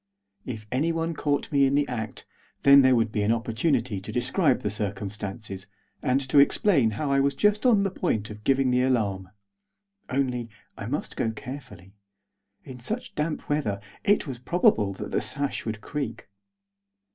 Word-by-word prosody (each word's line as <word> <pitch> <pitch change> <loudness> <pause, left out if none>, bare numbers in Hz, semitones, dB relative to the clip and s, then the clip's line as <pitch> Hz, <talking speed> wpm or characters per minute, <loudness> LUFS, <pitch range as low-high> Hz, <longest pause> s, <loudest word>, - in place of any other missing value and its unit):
If 110 -4 -5
anyone 165 +5 0
caught 145 -2 -1
me 140 -2 +4
in 135 - +1
the 145 0 +2
act, 110 -3 -5 0.4
then 140 0 +8
there 130 -1 +5
would 115 -2 +1
be 105 - -1
an 105 +2 +2
opportunity 115 - 0
to 105 - -7
describe 130 - +2
the 105 - -2
circumstances, 100 -1 -5 0.3
and 130 -1 +2
to 140 +2 +5
explain 140 - +4
how 145 -2 -1
I 140 - +3
was 140 0 +2
just 210 - +2
on 215 -5 +5
the 195 - 0
point 110 - -1
of 105 0 -10
giving 135 0 +2
the 125 0 +3
alarm. 105 -8 0 0.8
Only, 125 -3 -1 0.3
I - - -6
must - - -3
go 115 - 0
carefully. 110 -5 -9 0.7
In 125 -1 -10
such 220 - -3
damp 150 +1 -3
weather 140 -10 -1 0.2
it 205 - +3
was 130 -5 -6
probable 120 - +2
that - - -7
the - - +1
sash 140 -4 -3
would 110 -1 -4
creak. 140 -6 -5
130 Hz, 170 wpm, -26 LUFS, 110-145 Hz, 0.8 s, then